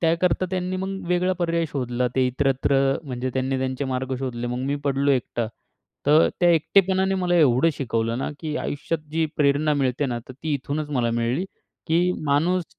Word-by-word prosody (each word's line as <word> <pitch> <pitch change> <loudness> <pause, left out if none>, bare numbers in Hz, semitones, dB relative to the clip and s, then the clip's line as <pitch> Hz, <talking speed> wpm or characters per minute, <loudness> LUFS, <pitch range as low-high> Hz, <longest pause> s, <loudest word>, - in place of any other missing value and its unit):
त्याकरता 170 +2 +2
त्यांनी 185 0 -2
मग 190 0 -4
वेगळा 180 +1 +2
पर्याय 170 -1 +1
शोधला. 125 -3 -1
ते 130 -1 +4
इतरत्र 135 +1 +1 0.3
म्हणजे 130 -2 -3
त्यांनी 130 0 0
त्यांचे 130 +1 -2
मार्ग 130 0 -2
शोधले. 120 -2 -3
मग 125 +1 -3
मी 140 +1 0
पडलो 140 0 +2
एकटा. 120 -3 0 0.6
तर 150 +2 +6
त्या 175 - +5
एकटेपणाने 190 +3 +3
मला 180 -2 0
एवढं 145 -3 +4
शिकवलं 115 -3 -1
ना, - - -2
की 155 -1 -3
आयुष्यात 160 +3 -2
जी 165 0 +1
प्रेरणा 150 +1 +2
मिळते 135 0 0
ना, 120 -2 -2
तर - - -7
ती 150 +4 -4
इथूनच 145 +2 -3
मला 125 -5 +1
मिळली 120 +8 0 0.4
की 175 +2 +2
माणूस 165 +6 +2
145 Hz, 175 wpm, -24 LUFS, 130-170 Hz, 0.6 s, तर